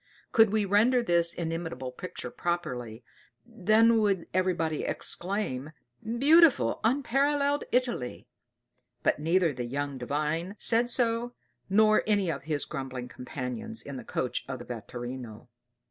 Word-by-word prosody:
Could 225 -2 +6
we 215 0 +1
render 230 +6 +3
this 170 -4 +2
inimitable 165 -5 -4
picture 180 +8 -7
properly, 125 -10 -3 0.4
then 225 0 +3
would 200 -5 +1
everybody 170 -4 0
exclaim, 175 -7 -2 0.3
"Beautiful, 265 - +4
unparalleled 280 +4 +1
Italy!" 245 - -1 0.8
But - - +2
neither 165 +1 +2
the 125 -1 -4
young 140 +2 -3
Divine 150 +8 -2
said 235 +1 +3
so, 240 0 0 0.3
nor 215 +2 +5
anyone 195 -8 +1
of 140 - -19
his 150 -2 -1
grumbling 130 -2 -6
companions 145 - -5
in 140 -2 -7
the - - -7
coach 125 - -2
of 130 - -3
the 120 - -10
vetturino. 120 0 -7
175 Hz, 125 wpm, -28 LUFS, -, 0.8 s, Could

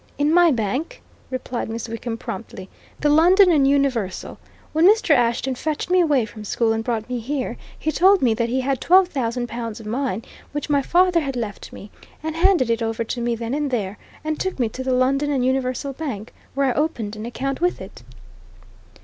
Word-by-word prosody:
"In 290 +2 +2
my 350 0 +6
bank," 260 - -2 0.3
replied 255 -2 -4
Miss 230 +1 -4
Wickham 230 0 -5
promptly. 190 -3 -7 0.3
"The 295 - +3
London 355 +5 +6
and 285 -4 +4
Universal. 270 -9 0 0.3
When 320 +3 +5
Mr. 425 -5 +3
Ashton 245 0 +2
fetched 310 +6 -3
me 365 0 +5
away 290 -8 +2
from 215 0 -10
school 225 +2 +1
and 225 0 -2
brought 225 -2 -2
me 250 -1 -3
here, 255 0 -3 0.2
he 310 - -1
told 380 +4 +5
me 235 -3 +4
that 235 +1 -1
he 260 +2 0
had 265 0 -1
twelve 370 +1 +5
thousand 245 -5 -2
pounds 230 -1 -5
of 220 - -11
mine 230 -1 -2 0.3
which 295 +1 -3
my 285 -1 +3
father 355 +3 +3
had 275 -4 -3
left 220 -5 -5
me, 200 - -11 0.3
and 315 0 -3
he 330 - -4
handed 345 -11 +4
it 230 +1 0
over 225 0 -1
to 240 +2 -4
me 235 0 0
then 230 +2 -4
and 295 0 -1
there, 210 -5 -3 0.2
and 310 0 -2
took 375 -1 -2
me 240 -4 0
to 260 +4 -6
the 260 - -1
London 270 +3 +2
and 265 -3 +1
Universal 260 +1 -1
Bank, 255 -8 -6 0.2
where 275 0 +2
I 260 - +2
opened 240 -9 -1
an 215 +2 -6
account 270 +4 -3
with 355 +1 +1
it." - - -10
260 Hz, 210 wpm, -22 LUFS, 230-300 Hz, 0.3 s, my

